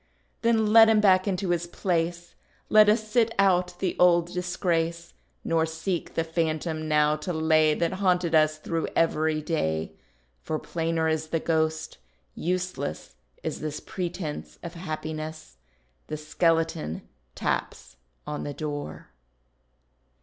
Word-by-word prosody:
Then 220 Hz, -2 st, +2 dB
let 225 Hz, -1 st, +9 dB
him 220 Hz, -1 st, +5 dB
back 190 Hz, -2 st, +4 dB
into 190 Hz, -1 st, -1 dB
his 175 Hz, 0 st, -1 dB
place, 175 Hz, -1 st, -2 dB, 0.4 s
Let 215 Hz, -1 st, +7 dB
us 215 Hz, 0 st, +2 dB
sit 225 Hz, 0 st, +2 dB
out 180 Hz, -2 st, +2 dB
the 185 Hz, -1 st, -1 dB
old 175 Hz, 0 st, +4 dB
disgrace; 170 Hz, -2 st, -1 dB, 0.3 s
Nor 165 Hz, -1 st, +1 dB
seek 160 Hz, +2 st, -4 dB
the 165 Hz, -, +1 dB
phantom 160 Hz, -1 st, -2 dB
now 150 Hz, 0 st, +3 dB
to 155 Hz, +4 st, -4 dB
lay, 160 Hz, -1 st, +3 dB
That 170 Hz, +3 st, 0 dB
haunted 180 Hz, -3 st, +2 dB
us 155 Hz, -1 st, +4 dB
through 165 Hz, +1 st, -2 dB
every 155 Hz, -1 st, +1 dB
day; 80 Hz, -, -1 dB, 0.5 s
For 155 Hz, -, -2 dB
plainer 165 Hz, 0 st, -1 dB
is 160 Hz, 0 st, -1 dB
the 165 Hz, +1 st, -1 dB
ghost; 160 Hz, -1 st, -1 dB, 0.3 s
useless 180 Hz, -, -3 dB, 0.3 s
Is -, -, -3 dB
this 150 Hz, -1 st, -4 dB
pretence 175 Hz, -4 st, -5 dB
of 170 Hz, -1 st, -6 dB
happiness; 155 Hz, -, -6 dB, 0.5 s
The 155 Hz, -, -4 dB
skeleton 160 Hz, -, 0 dB, 0.3 s
taps -, -, -3 dB, 0.3 s
on 150 Hz, -, -4 dB
the 145 Hz, -, -5 dB
door. 145 Hz, -, -5 dB
165 Hz, 130 wpm, -26 LUFS, 155-180 Hz, 0.5 s, let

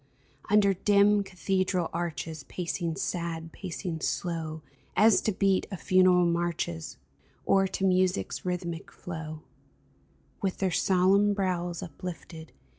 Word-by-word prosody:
Under 200 Hz, -1 st, +5 dB
dim 205 Hz, +2 st, +4 dB
cathedral 185 Hz, -2 st, -1 dB
arches 165 Hz, -2 st, -4 dB
Pacing 170 Hz, -2 st, -3 dB
sad, 170 Hz, -3 st, -3 dB
pacing 180 Hz, -2 st, -5 dB
slow, 160 Hz, -3 st, -3 dB, 0.3 s
As 215 Hz, -2 st, +5 dB
to 215 Hz, -, 0 dB
beat 195 Hz, -1 st, +1 dB
of 190 Hz, -4 st, -6 dB
funeral 185 Hz, -1 st, +4 dB
marches 170 Hz, -, -2 dB, 0.5 s
Or 195 Hz, 0 st, +4 dB
to 190 Hz, -, -4 dB
music's 185 Hz, 0 st, +1 dB
rhythmic 180 Hz, -2 st, -4 dB
flow 160 Hz, -2 st, -7 dB, 0.5 s
— 65 Hz, 0 st, -36 dB
With 190 Hz, -2 st, -1 dB
their 190 Hz, -2 st, 0 dB
solemn 195 Hz, +3 st, +3 dB
brows 175 Hz, -3 st, -1 dB
uplifted. 165 Hz, 0 st, -8 dB
180 Hz, 115 wpm, -28 LUFS, 165-195 Hz, 0.5 s, Under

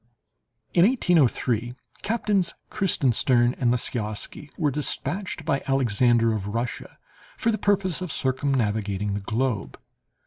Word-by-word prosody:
In 170 Hz, -, +5 dB
1803, 130 Hz, -, +1 dB, 0.3 s
Captains 210 Hz, -4 st, 0 dB, 0.2 s
Kreutzenstern 125 Hz, -, +2 dB
and 125 Hz, -, +2 dB
Lisiausky 120 Hz, +3 st, -3 dB
were 150 Hz, -4 st, +1 dB
dispatched 175 Hz, +7 st, -2 dB
by 140 Hz, -, 0 dB
Alexander 120 Hz, -3 st, +3 dB
of 105 Hz, 0 st, -4 dB
Russia 115 Hz, +1 st, -4 dB, 0.4 s
for 230 Hz, -, +1 dB
the 215 Hz, -, -2 dB
purpose 190 Hz, -4 st, +1 dB
of 180 Hz, -4 st, -4 dB
circumnavigating 110 Hz, -8 st, -1 dB
the 100 Hz, -, -2 dB
globe. 110 Hz, -, -2 dB
130 Hz, 110 wpm, -25 LUFS, 110-170 Hz, 0.4 s, In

